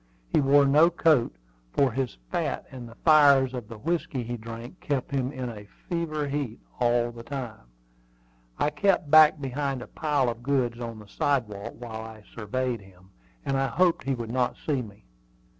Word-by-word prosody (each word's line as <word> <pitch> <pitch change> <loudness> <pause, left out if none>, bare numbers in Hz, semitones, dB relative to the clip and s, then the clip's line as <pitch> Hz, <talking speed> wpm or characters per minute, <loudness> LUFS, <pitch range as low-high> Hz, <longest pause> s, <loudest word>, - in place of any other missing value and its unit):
He - - +5
wore 140 +1 +5
no 150 +5 +6
coat, 155 - +2 0.4
for 135 -2 +3
his 130 - -3
fat - - -2
and 125 -3 -8
the 115 - -14
fires 140 -5 +6
of 120 -4 -5
the 115 - -9
whiskey 150 -1 -2
he 120 +1 -4
drank 115 +6 -9
kept 145 +2 -2
him 135 -1 -1
in 130 -3 -5
a 105 -3 -8 0.2
fever 155 -4 -1
heat 140 -5 -3 0.2
all 120 -1 +2
the 115 0 -10
time. 115 - -7 0.9
I 150 - +1
kept 150 -1 +1
back 155 -1 +8
behind 135 -1 -3
a - - -11
pile 145 -4 0
of 115 0 -3
goods 125 -3 0
on 115 -2 -5
the 105 -1 -12
sidewalk 110 -3 -1
while 115 -2 -7
I 110 -1 -10
surveyed 120 +1 -2
him, 95 -1 -19 0.3
and 135 - 0
I 135 0 +1
hoped 175 0 +2
he 135 -1 0
would 115 -2 -5
not 125 0 0
see 140 -4 +1
me. 105 -4 -12
130 Hz, 180 wpm, -27 LUFS, 115-145 Hz, 0.9 s, back